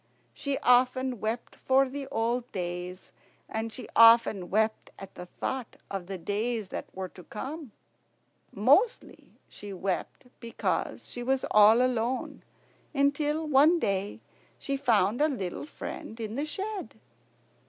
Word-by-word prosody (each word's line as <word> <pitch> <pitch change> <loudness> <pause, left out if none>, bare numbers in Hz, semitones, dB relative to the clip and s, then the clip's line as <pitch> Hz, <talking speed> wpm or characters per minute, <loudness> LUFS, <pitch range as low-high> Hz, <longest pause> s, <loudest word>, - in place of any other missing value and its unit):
she 280 -1 -2
often 255 0 +3
wept 220 +3 -3
for 265 +1 +3
the 275 +1 -6
old 235 +2 -1
days, 180 0 -5 0.4
and 225 +1 -3
she 255 - -8
often 230 -5 +6
wept 220 +2 0
at 195 -1 -10
the 180 - -9
thought 255 +6 -5 0.2
of 195 -3 -4
the 195 0 -5
days 210 +3 -2
that - - -5
were 190 0 -4
to 180 0 -14
come. 280 +3 -7 0.8
Mostly 300 - +1
she 205 - -10
wept 190 +6 -3
because 235 -1 -3
she 245 - -6
was 260 +2 0
all 215 +3 +7
alone, 250 0 -1 0.5
until 290 +3 +1
one 300 +4 +5
day 200 - -1 0.4
she 275 - -3
found 225 -3 +2
a 305 - +5
little 200 - -4
friend 225 -6 -8
in 220 -1 -4
the 285 +5 -2
shed. 395 +5 -5
235 Hz, 135 wpm, -28 LUFS, 205-270 Hz, 0.8 s, all